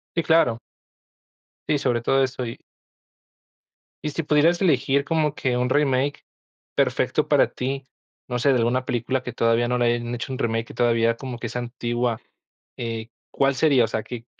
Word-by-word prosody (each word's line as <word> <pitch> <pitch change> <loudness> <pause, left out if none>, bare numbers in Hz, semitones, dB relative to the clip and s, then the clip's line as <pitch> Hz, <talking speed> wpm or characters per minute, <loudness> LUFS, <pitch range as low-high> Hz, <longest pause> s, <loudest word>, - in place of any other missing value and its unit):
Sí, 170 - +2
claro. 145 -8 +3 1.1
Sí, 150 - +2
sobre 125 -3 0
todo 135 +3 +3
esto, 130 -1 -3
y. 115 -1 -7 1.4
¿Y 150 - -1
si 165 +2 -3
pudieras 155 +3 +3
elegir, 140 -5 +2
como 155 -2 +1
que 125 -2 -1
un 125 +1 0
remake 140 0 +1 0.5
perfecto - - +1
para - - +4
ti? 135 +1 -3 0.4
No 125 -1 -2
sé, 140 - +2
de 135 - +3
alguna 120 +2 +1
película, 125 +2 -1
que 125 - -6
todavía 115 +1 +2
no 125 0 0
le 120 -1 +3
hayan 120 0 -4
hecho 120 +2 -5
un 130 - -4
remake. 115 -1 -1
Que - - -11
todavía, 115 -1 +2
como 125 -1 -6
que 120 - -5
es - - -9
antigua. 120 -1 -2 0.6
Eh, 115 -1 -4 0.2
¿cuál 140 0 +2
sería? 135 -3 +4
O - - +1
sea, 110 0 -3
¿qué 120 -2 -8
125 Hz, 180 wpm, -23 LUFS, 120-140 Hz, 1.4 s, para